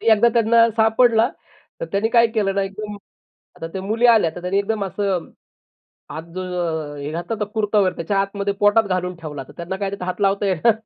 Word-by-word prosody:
ते 225 - +4
एकदा 225 +2 +5
त्यांना 230 0 +4
सापडला, 225 +1 +4 0.5
तर - - -3
त्यांनी 215 +3 +1
काय 235 -1 +5
केलं 215 -4 -1
ना, 195 - +1
एकदम 205 +2 -6 0.6
आता 165 - -6
त्या 190 - -5
मुली 225 +5 +1
आल्या, 220 -9 +5
तर 175 - -7
त्यांनी 185 +2 -1
एकदम 205 0 -1
असं 190 -2 -2 0.8
आत 155 +3 -6
जो 185 - -3 0.5
अ, - - -9
हे 145 +1 -5
घातला 170 +6 -4
होता 210 - 0
कुर्ता 210 -1 +1
वगैरे, 190 -2 +1
त्याच्या 195 +4 -1
आतमध्ये 200 0 -1
पोटात 205 +2 +4
घालून 180 -2 -2
ठेवला. 150 -4 -7
तर - - -13
त्यांना 170 +2 -4
काय 200 -1 -2
त्यात 195 -2 -6
हात 185 +2 -4
लावता 200 +1 +2
येईना. 195 +4 +3
200 Hz, 210 wpm, -21 LUFS, 185-220 Hz, 0.8 s, एकदा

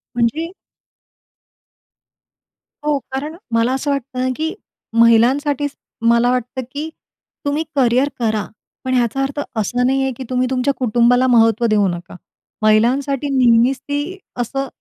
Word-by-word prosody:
म्हणजे? 270 +9 0 2.3
हो 300 -1 +2
कारण 290 +4 -4 0.2
मला 230 +2 +2
असं 275 +2 -1
वाटतं 275 -2 -3
ना 255 - +1
की 320 +4 -2 0.5
महिलांसाठीच 275 +5 +3 0.4
मला 235 +1 +3
वाटतं 250 +1 -2
की 295 +3 -4 0.6
तुम्ही 290 +2 0
करिअर 255 +1 +3
करा. 215 -4 0 0.4
पण 255 - -2
ह्याचा 245 +1 +1
अर्थ 275 +2 -3 0.2
असा 235 +3 0
नाही 265 +2 +2
आहे 265 - 0
की 265 - -5
तुम्ही 255 0 +1
तुमच्या 260 +2 +1
कुटुंबाला 245 +1 +3
महत्त्व 230 -1 +4
देऊ 210 -2 +3
नका. 175 -1 -6 0.5
महिलांसाठी 255 +6 +2
नेहमीच 245 +1 +4
ती 290 +7 -4 0.2
असं 270 +3 -3
255 Hz, 130 wpm, -19 LUFS, 235-280 Hz, 2.3 s, महत्त्व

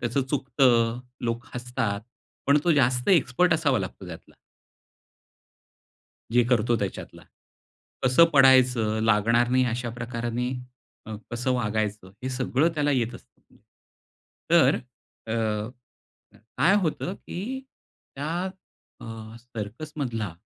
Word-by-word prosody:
त्याचं 120 +3 0
चुकतं, 125 -4 +2 0.3
लोक 115 +1 -2
हसतात. 120 -4 -2 0.5
पण 140 +1 +5
तो 170 - +4
जास्त 125 -1 +2
एक्सपर्ट 170 0 +4
असावा 145 -7 +2
लागतो 95 0 -6
त्यातला. 80 -2 -11 2.0
जे 120 +1 +4
करतो 120 -1 +3
त्याच्यातला. 100 -2 -5 0.8
कसं 130 +6 +6
पडायचं, 125 -5 +5
लागणार 115 +3 +3
नाही 130 0 +3
अशा 120 0 -2
प्रकाराने 120 +1 -3 0.6
अ, 110 - -6 0.2
कसं 125 +2 -1
वागायचं 105 -5 -2
हे 130 - -2
सगळं 130 +4 +1
त्याला 145 -1 +1
येत 120 -3 0
असतं. - - -18 0.9
तर - - +6 0.5
अ, 110 - -3 1.3
काय 190 +6 +5
होतं, 175 +3 -2
की 250 +10 -6 0.5
त्या 145 +3 -4 0.7
अ, - - -10 0.3
सर्कसमधला 115 - -5
125 Hz, 105 wpm, -26 LUFS, 115-135 Hz, 2.0 s, कसं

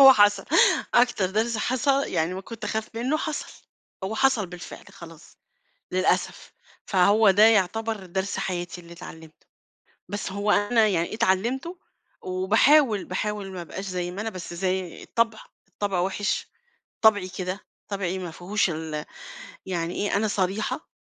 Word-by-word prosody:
هو 270 -1 +11
حصل، 205 -3 +4 0.5
أكتر 240 -5 +4
درس 225 +3 0
حص 250 +4 -1
يعني 185 -11 +1
ما 190 - -5
كنت 230 +3 -9
أخاف 220 0 -2
منّه 250 +6 0
حصل، 310 -1 -5 0.4
هو 205 +3 -3
حصل 240 -5 +2
بالفعل، 180 0 -10
خلاص، 165 -2 -13 0.6
للأسف، 185 0 0 0.3
فهو 200 +2 +5
ده 205 +2 +4
يعتبر 220 0 +1
درس 190 +2 -2
حياتي 175 -1 -3
اللي 170 0 -14
اتعلِّمته، 160 -2 -12 0.6
بس 205 -1 -4
هو 200 +1 -1
أنا 215 +2 +4
يعني 175 -1 0
اتعلِّمته، 240 - 0 0.4
وباحاول، 210 +5 +3
باحاول 200 +1 -3
ما 180 - -6
أبقاش 190 +4 -7
زي 180 -2 -3
ما 185 +3 -6
أنا، 225 +1 -2
بس 185 -3 -7
زي 185 0 -2
الطبع 230 -1 0 0.3
الطبع 200 -3 -2
وِحِش، 205 +4 -1 0.5
طبعي 205 -4 +5
كده، 185 +1 -4 0.3
طبعي 190 -2 -2
ما 175 -3 -5
فيهوش 195 +4 0
ال 155 -2 -4 0.6
يعني 175 -2 -2
إيه، 205 -1 0
أنا 215 +2 +1
صريحة 195 +1 -2
200 Hz, 145 wpm, -25 LUFS, 180-220 Hz, 0.6 s, هو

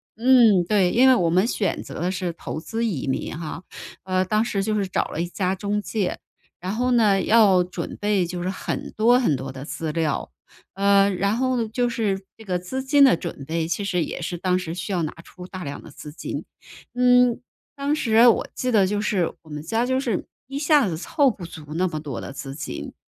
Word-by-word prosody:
嗯， 230 -6 +5
对， 195 -4 +3
因 255 +3 +5
为 260 - +8
我 175 -8 +2
们 185 +5 +3
选 205 -6 -1
择 - - -8
的 180 +1 0
是 180 -2 -3
投 160 - -6
资 225 +8 -4
移 195 - -1
民 135 +3 -2
哈。 165 +1 -6 0.4
呃， 185 0 +1
当 215 +3 +1
时 200 -4 -1
就 215 - -1
是 205 -2 0
找 185 - 0
了 160 - -3
一 175 - -2
家 185 +1 -1
中 205 +2 -2
介， 205 -4 -2 0.4
然 185 +2 -4
后 250 +2 0
呢， 210 -5 +4
要 200 -5 +5
准 180 -1 -6
备 205 -3 +2
就 175 +1 -5
是 180 - -2
很 190 - -4
多 240 +3 +5
很 160 - +2
多 135 +1 -5
的 130 +1 -8
资 160 0 -4
料。 155 -2 -1 0.4
呃， 200 0 +4
然 200 +3 0
后 250 -2 0
就 245 +2 0
是 205 -5 -1
这 220 - -13
个 180 -2 0
资 220 +10 -4
金 280 +2 +4
的 260 -11 +6
准 140 - -6
备， 160 +1 -2
其 200 - -2
实 180 -4 0
也 - - -6
是 175 +1 -3
当 180 +1 +1
时 175 -3 -4
需 175 +2 -4
要 175 -2 0
拿 155 - -2
出 180 0 -12
大 185 0 -7
量 140 0 -6
的 - - -12
资 150 - -10
金， - - -5 0.5
嗯， 250 -1 +4 0.3
当 280 +1 -1
时 230 -6 +4
我 230 - +3
记 255 - -1
得 200 -5 +4
就 205 +1 -1
是 195 -5 0
我 160 - -19
们 150 -1 -6
家 225 +10 0
就 260 +1 +1
是 235 -8 -2 0.2
一 275 +1 -5
下 295 -4 +4
子 165 -4 -3
凑 285 - +2
不 195 -7 -6
足 160 -2 -10
那 180 +2 +1
么 155 - -4
多 145 -5 -6
的 - - -7
资 135 0 -7
金。 145 - -6
195 Hz, 240 characters per minute, -23 LUFS, 170-230 Hz, 0.5 s, 为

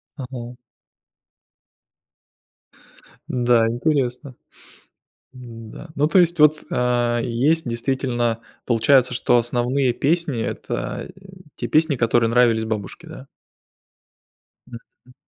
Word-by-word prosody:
Ага. 125 -3 -8 2.7
Да, 120 -2 +2
интересно. 125 +1 -1 1.0
М-да. 115 +3 -11
Ну 145 - +2
то 185 - +3
есть 170 -1 +1
вот, 150 0 +4
а, 120 -1 0
есть, 130 +6 +1
действительно, 120 -1 -1 0.3
получается, 125 +2 +3
что 120 - +2
основные 125 +2 0
песни 145 -1 0
это, - - -5
э, - - -18 0.4
те - - -4
песни, 155 -2 +2
которые 115 -1 +2
нравились 115 -2 +3
бабушке, 105 -4 -5
да? - - -11 1.4
Мгм. 120 +1 -15
125 Hz, 95 wpm, -21 LUFS, 120-140 Hz, 2.7 s, вот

